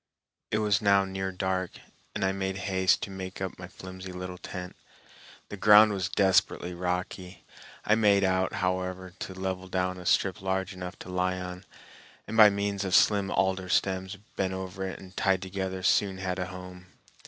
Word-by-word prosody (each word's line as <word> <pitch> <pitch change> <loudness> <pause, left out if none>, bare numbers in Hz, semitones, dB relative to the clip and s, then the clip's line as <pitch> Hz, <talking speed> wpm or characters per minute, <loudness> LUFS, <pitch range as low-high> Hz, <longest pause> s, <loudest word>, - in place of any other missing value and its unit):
It 110 - +1
was 105 -1 +2
now 100 -1 +4
near 95 0 -3
dark, 95 -1 -2 0.4
and - - 0
I 95 - +2
made 95 0 -3
haste 95 -1 +2
to 100 - -5
make 95 -1 -7
up 95 -1 -5
my 90 - -7
flimsy 95 0 -9
little 90 0 -7
tent. 90 -1 -7 0.7
The 105 - -6
ground 105 +1 +7
was 95 -2 -2
desperately 95 -2 +2
rocky. 90 +1 -4 0.4
I 105 - +4
made 105 -3 +4
out, 95 0 +2
however, 95 0 -2
to 95 - -6
level 95 0 -3
down 90 0 -1
a 90 - -7
strip 95 -2 +2
large 95 0 -1
enough 90 0 -7
to - - -10
lie 90 0 0
on, 90 +1 -7 0.6
and 110 - -6
by 110 -2 +9
means 100 0 -1
of 95 -2 +1
slim 100 -2 +4
alder 95 -1 0
stems 95 +1 0 0.2
bent 95 -1 -1
over 95 0 -4
it 95 - -6
and 95 0 -13
tied 95 -1 +1
together 95 0 -4
soon 95 0 +2
had 95 -1 -3
a 90 - -2
home. 90 0 -10
95 Hz, 180 wpm, -28 LUFS, 90-95 Hz, 0.7 s, by